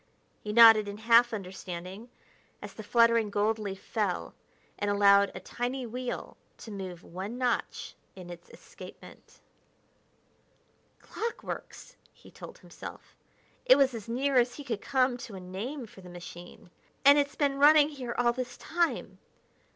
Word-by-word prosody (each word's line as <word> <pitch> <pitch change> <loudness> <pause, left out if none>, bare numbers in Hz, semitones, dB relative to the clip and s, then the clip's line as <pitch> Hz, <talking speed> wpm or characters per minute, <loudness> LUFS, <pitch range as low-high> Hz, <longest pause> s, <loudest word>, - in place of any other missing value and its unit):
He 210 - -5
nodded 225 -2 +8
in 205 0 -6
half 230 +2 +5
understanding 190 +1 -7 0.5
as - - -9
the - - -9
fluttering 230 0 +3
gold 210 +2 0
leaf 195 -2 -5
fell 205 -5 -2 0.5
and 205 - -1
allowed 200 -1 +5
a - - -5
tiny 245 +6 -4
wheel 250 +2 -6 0.2
to 225 - -10
move 185 -3 -7
one 195 +7 -7
notch 250 -2 -2 0.2
in 180 -2 -10
its 175 0 -12
escapement. - - -14 1.6
"Clockworks!" 460 +1 -6 0.2
he - - -18
told - - -11
himself - - -11 0.5
it - - +7
was 270 -2 +3
as 230 -1 -8
near 265 +3 0
as 245 0 +1
he 290 - -8
could 230 -7 -4
come 255 -2 +1
to 230 -4 -9
a - - -7
name 215 +10 -6
for 200 -3 -15
the 180 - -12
machine 175 0 -11 0.3
"and 285 +1 +8
it's 285 0 -1
been 280 -2 0
running 295 +1 +7
here 255 -5 -6
all 240 -1 +3
this 255 0 -5
time.... 340 0 -2
230 Hz, 150 wpm, -29 LUFS, 200-255 Hz, 1.6 s, nodded